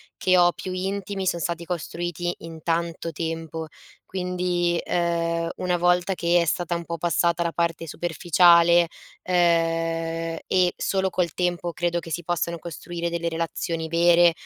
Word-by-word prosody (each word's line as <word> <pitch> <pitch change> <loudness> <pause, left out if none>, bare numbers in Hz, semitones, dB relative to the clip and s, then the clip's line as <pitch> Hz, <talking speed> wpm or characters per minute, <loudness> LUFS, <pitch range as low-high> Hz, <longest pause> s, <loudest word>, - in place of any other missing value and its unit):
che 185 0 +3
ho, 175 0 +5
più 185 - -6
intimi, 195 +1 -3
son 170 - 0
stati 170 +1 -3
costruiti 175 0 -3
in 160 -1 -10
tanto 170 0 -1
tempo. 160 0 -4 0.4
Quindi, 180 -2 -1
uhm, 170 -1 0
una 180 -1 0
volta 175 +2 +2
che 170 0 +3
è - - +1
stata 175 +2 -1
un 170 0 -4
pò 170 0 -4
passata 170 +1 +1
la 170 - -1
parte 165 -1 -1
superficiale, 170 +1 +4 0.4
uhm, 185 - -4 1.1
e 180 -1 +3
solo 190 -1 0
col 175 -4 -1
tempo 175 -1 -1
credo 175 0 0
che 165 - -10
si 175 +2 -3
possano 170 0 -1
costruire 170 +1 -5
delle 170 0 -2
relazioni 165 0 -3
vere, 170 +1 +5
170 Hz, 150 wpm, -24 LUFS, 170-175 Hz, 1.1 s, ho